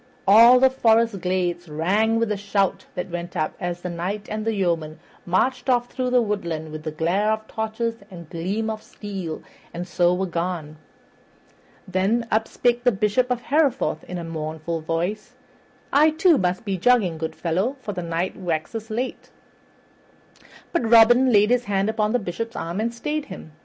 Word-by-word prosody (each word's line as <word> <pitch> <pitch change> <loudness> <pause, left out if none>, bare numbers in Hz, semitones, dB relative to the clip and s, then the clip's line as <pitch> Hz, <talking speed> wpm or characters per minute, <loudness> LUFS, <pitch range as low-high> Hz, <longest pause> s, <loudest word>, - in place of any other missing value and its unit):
All 230 +5 +8
the 265 0 +5
forest 230 -5 +2
glades 175 -2 -1
rang 200 +9 +1
with 230 -1 0
the 210 - 0
shout 200 -1 -1
that 180 0 -4
went 175 0 -5
up 155 - -1
as 175 0 -4
the 180 - -4
Knight 195 +5 -4
and 215 0 -3
the 225 -1 0
yeomen 165 -5 -1 0.3
marched 250 +9 +1
off 245 -1 +2
through 255 -1 -2
the 250 -1 +3
woodland 170 -7 -3
with 155 0 -6
glare 190 +7 +1
of 220 0 -3
torches 225 +1 -3
and 170 -4 -10
gleam 190 +8 -3
of 215 0 -6
steel, 195 -8 -7 0.3
and 175 +1 -5
so 175 -1 +2
were 185 +2 0
gone. 170 -3 -4 1.1
Then 195 +6 +1
up 220 +1 +1
spake 245 0 0
the 245 - +4
Bishop 210 +5 +1
of 250 -1 -1
Hereford 280 -1 +1
in 180 - -5
a 170 - -5
mournful 160 0 -4
voice, 180 +9 -3 0.6
"I, 300 +3 +6
too, 320 0 +3
must 185 +4 -1
be 195 -3 -2
jogging, 195 -7 +3
good 160 0 -4
fellow, 185 +10 -1
for 210 -5 -5
the 180 - -4
night 170 +2 -2
waxes 185 +5 -4
late." 240 +4 -4 1.4
But 245 -10 0
Robin 240 +3 +6
laid 210 +1 +4
his 245 0 +2
hand 195 0 0
upon 215 -1 0
the 245 - +3
Bishop's 230 +3 -5
arm 170 +4 -4
and 230 +2 0
stayed 300 +5 -3
him. 185 - -10
200 Hz, 175 wpm, -23 LUFS, 175-230 Hz, 1.4 s, All